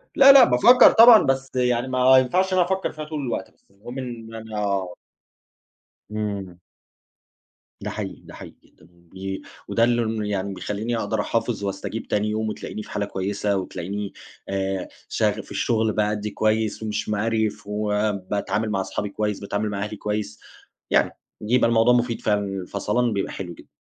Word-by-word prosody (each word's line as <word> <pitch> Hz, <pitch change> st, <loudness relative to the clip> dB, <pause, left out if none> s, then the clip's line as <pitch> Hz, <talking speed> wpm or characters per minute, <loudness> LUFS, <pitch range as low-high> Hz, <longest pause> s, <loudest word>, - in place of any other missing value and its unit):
لا، 275 Hz, 0 st, +9 dB
لأ، 275 Hz, -2 st, +9 dB
بافكّر 240 Hz, -, +7 dB
طبعًا، 230 Hz, -1 st, +8 dB
بس 135 Hz, 0 st, -1 dB
يعني 125 Hz, 0 st, +1 dB
ما 130 Hz, 0 st, +5 dB
ينفعش 185 Hz, +9 st, +2 dB
إن -, -, +2 dB
أنا 180 Hz, -, +4 dB
أفكّر 190 Hz, +1 st, -1 dB
فيها 155 Hz, 0 st, -7 dB
طول 155 Hz, -1 st, -5 dB
الوقت 125 Hz, -4 st, -4 dB
بس، -, -, -35 dB
المهم 110 Hz, +6 st, -10 dB
إن 115 Hz, -3 st, -7 dB
أنا 105 Hz, -3 st, -2 dB, 1.2 s
امم. 100 Hz, -4 st, -5 dB, 1.2 s
ده -, -, -4 dB
حقيقي، -, -, -6 dB
ده -, -, -14 dB
حقيقي -, -, -11 dB
جدًا، 80 Hz, -, -23 dB
بي 95 Hz, +3 st, -8 dB, 0.3 s
وده 115 Hz, -, +1 dB
اللي 120 Hz, 0 st, +3 dB
ن 110 Hz, -1 st, -2 dB
يعني 100 Hz, -1 st, -2 dB
بيخلّيني 110 Hz, +5 st, -3 dB
أقدر 110 Hz, -1 st, -1 dB
أحافظ 115 Hz, -1 st, -2 dB
واستجيب 100 Hz, +3 st, -4 dB
تاني 105 Hz, +1 st, 0 dB
يوم 110 Hz, 0 st, -1 dB
وتلاقيني 105 Hz, 0 st, -6 dB
في -, -, -13 dB
حالة 100 Hz, -, -1 dB
كويسة، 100 Hz, +1 st, -2 dB
وتلاقيني 95 Hz, +2 st, -5 dB, 0.4 s
آآ، 95 Hz, -1 st, -2 dB, 0.2 s
شغ -, -, 0 dB
في -, -, -18 dB
الشغل 110 Hz, -2 st, 0 dB
بأدّي 105 Hz, 0 st, -1 dB
كويس 110 Hz, 0 st, 0 dB
ومش 105 Hz, 0 st, -3 dB
مقريف، 105 Hz, 0 st, -1 dB
وباتعامل 105 Hz, 0 st, -1 dB
مع 95 Hz, -2 st, 0 dB
اصحابي 95 Hz, +2 st, -4 dB
كويس، 105 Hz, 0 st, -2 dB
باتعامل 100 Hz, +1 st, -2 dB
مع 100 Hz, -1 st, -3 dB
أهلي 105 Hz, 0 st, -5 dB
كويس، 105 Hz, 0 st, -4 dB, 0.5 s
يعني -, -, +3 dB, 0.3 s
يبقي 115 Hz, +2 st, +2 dB
الموضوع 115 Hz, +1 st, +4 dB
مفيد 120 Hz, -1 st, 0 dB
فعلًا، 105 Hz, -1 st, +1 dB
الفصلان 100 Hz, +5 st, -1 dB
بيبقى 100 Hz, -, -2 dB
حلو 90 Hz, -3 st, -6 dB
جدًا. -, -, -16 dB
105 Hz, 165 wpm, -23 LUFS, 100-120 Hz, 1.2 s, لا